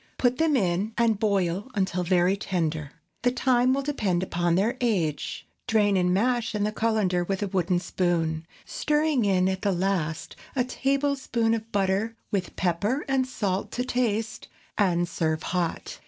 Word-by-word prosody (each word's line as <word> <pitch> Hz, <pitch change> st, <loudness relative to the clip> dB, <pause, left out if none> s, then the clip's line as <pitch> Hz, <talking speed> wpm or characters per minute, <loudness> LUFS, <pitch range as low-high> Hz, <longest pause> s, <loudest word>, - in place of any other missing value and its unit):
Put 250 Hz, 0 st, +1 dB
them 320 Hz, -2 st, +3 dB
in 195 Hz, 0 st, 0 dB
and 230 Hz, -3 st, +2 dB
boil 200 Hz, 0 st, 0 dB
until 190 Hz, -2 st, 0 dB
very 180 Hz, +1 st, +3 dB
tender. 160 Hz, -7 st, -2 dB, 0.3 s
The 245 Hz, -, +3 dB
time 255 Hz, 0 st, +2 dB
will 275 Hz, +1 st, +1 dB
depend 205 Hz, -11 st, 0 dB
upon 175 Hz, -2 st, 0 dB
their 215 Hz, +7 st, +1 dB
age. 170 Hz, -11 st, -1 dB, 0.2 s
Drain 210 Hz, -3 st, +3 dB
and 180 Hz, -1 st, +2 dB
mash 230 Hz, +3 st, +1 dB
in 205 Hz, -, 0 dB
the 210 Hz, -, 0 dB
cullender 215 Hz, -5 st, +1 dB
with 195 Hz, +3 st, -2 dB
a -, -, -1 dB
wooden 185 Hz, -2 st, +1 dB
spoon, 170 Hz, -3 st, -1 dB, 0.2 s
stirring 300 Hz, -5 st, +1 dB
in 185 Hz, -2 st, +3 dB
at 190 Hz, 0 st, -1 dB
the 205 Hz, -, +1 dB
last 180 Hz, -4 st, -1 dB, 0.2 s
a 255 Hz, -, +2 dB
tablespoonful 270 Hz, -3 st, 0 dB
of 225 Hz, 0 st, -4 dB
butter 200 Hz, +3 st, 0 dB, 0.2 s
with 190 Hz, -3 st, -2 dB
pepper 200 Hz, -, 0 dB
and 265 Hz, -1 st, +1 dB
salt 200 Hz, -6 st, -2 dB
to 250 Hz, -, -1 dB
taste, 225 Hz, -3 st, -1 dB, 0.3 s
and 175 Hz, -4 st, +2 dB
serve 160 Hz, -2 st, -1 dB
hot. 175 Hz, -2 st, -2 dB
200 Hz, 160 wpm, -26 LUFS, 180-235 Hz, 0.3 s, them